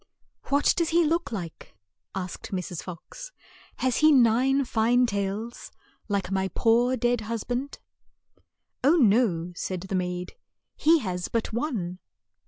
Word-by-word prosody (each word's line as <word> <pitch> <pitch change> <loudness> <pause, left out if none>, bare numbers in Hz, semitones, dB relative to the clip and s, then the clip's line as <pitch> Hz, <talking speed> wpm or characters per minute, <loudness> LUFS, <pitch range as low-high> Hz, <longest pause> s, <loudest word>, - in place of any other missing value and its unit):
"What 285 +1 +3
does 335 -2 +1
he 340 +1 +4
look 335 0 0
like?" 170 - -7 0.4
asked 185 -2 -6
Mrs. 180 -2 -4
Fox. 195 - -9 0.4
"Has 255 -2 0
he 310 0 +6
nine 260 +2 +4
fine 240 +2 +3
tails, 205 +2 -4 0.4
like 200 -3 -2
my 190 0 0
poor 240 +3 +3
dead 240 -1 +1
hus 225 0 -4
band?" 255 +3 -3 0.6
■ - - -32 0.4
"Oh, 290 +6 +5
no," 205 - +3
said 185 0 -4
the 190 +1 -7
maid, 180 0 -3 0.4
"he 325 +2 +4
has 180 -4 -3
but 230 -1 -2
one." 215 - -3
225 Hz, 140 wpm, -26 LUFS, 185-260 Hz, 0.6 s, he